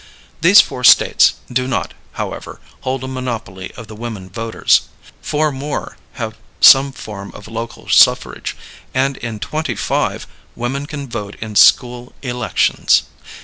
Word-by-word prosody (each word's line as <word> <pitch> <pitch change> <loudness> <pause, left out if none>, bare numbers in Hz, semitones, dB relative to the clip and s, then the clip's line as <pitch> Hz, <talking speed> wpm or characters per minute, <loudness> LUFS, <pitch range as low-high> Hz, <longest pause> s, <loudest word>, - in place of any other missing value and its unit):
These 185 +6 +8
four 125 - -7
States - - +6 0.2
do 130 +1 0
not, 130 - -2 0.2
however, - - -6 0.2
hold 130 0 -3
a - - -4
monopoly 115 -8 -5
of 115 - -8
the 110 0 -11
women 105 -5 -7
voters. 115 +2 +1 0.3
Four 150 0 0
more 140 +2 -5 0.2
have 115 -3 -5 0.2
some 135 +1 +7
form 105 -6 -9
of 105 - -11
local 115 +1 -7
suffrage, - - +3 0.4
and 135 +1 +1
in 115 -2 -6
twenty 155 +7 -3
five - - -2 0.3
women 135 +4 -3
can 145 -2 -6
vote 105 -4 -6
on 110 -1 -7
school 125 +2 +4
elections. 125 -2 +1
125 Hz, 140 wpm, -17 LUFS, 110-135 Hz, 0.4 s, These